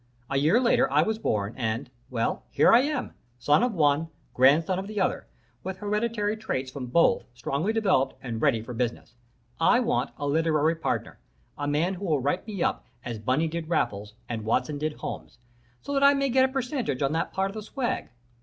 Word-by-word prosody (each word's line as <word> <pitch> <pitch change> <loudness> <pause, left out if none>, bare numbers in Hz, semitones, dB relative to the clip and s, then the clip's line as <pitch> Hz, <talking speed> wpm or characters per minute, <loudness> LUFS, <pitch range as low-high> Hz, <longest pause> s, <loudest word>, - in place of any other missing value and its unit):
A 135 - +1
year 155 - +4
later 240 - +3
I 150 +2 +4
was 220 +4 -2
born, 105 - -1
and 115 0 -3 0.2
well, 115 -3 -2
here - - +4
I 230 - +8
am 290 +3 -2 0.2
son 145 - +3
of 245 -3 0
one, 150 0 +2 0.3
grandson 155 +8 +4
of 195 - -5
the 210 -1 -4
other, 190 - -1 0.4
with 190 +1 -5
hereditary 210 +1 -1
traits 135 -12 -3
from 130 -2 -6
both 165 +8 +3
strongly 140 - -1
developed 190 -12 +1
and 115 -3 -5
ready 125 -7 +2
for 125 - -7
business. 120 0 -3 0.5
I 205 +9 +5
want 245 0 0
a 145 - -4
literary 155 +1 +2
partner 165 - -3 0.4
a 145 - -4
man 155 +6 +1
who 195 +2 -6
will 155 -5 +1
write 145 - -1
me 200 -5 -2
up - - -1 0.2
as 120 -3 -4
Bunny 130 +9 +1
did 165 0 -5
Raffles, 105 -10 -1
and 115 -2 -4
Watson 145 +6 0
did 155 +1 -1
Holmes, - - -7 0.5
so 285 - -4
that 275 0 +2
I 280 0 +7
may 275 0 +1
get 260 +1 +4
a 260 - -2
percentage 250 - -2
on 135 - +1
that 160 - -1
part 195 0 -1
of - - -13
the 215 - -5
swag. 245 +3 -3
160 Hz, 200 wpm, -26 LUFS, 130-215 Hz, 0.5 s, I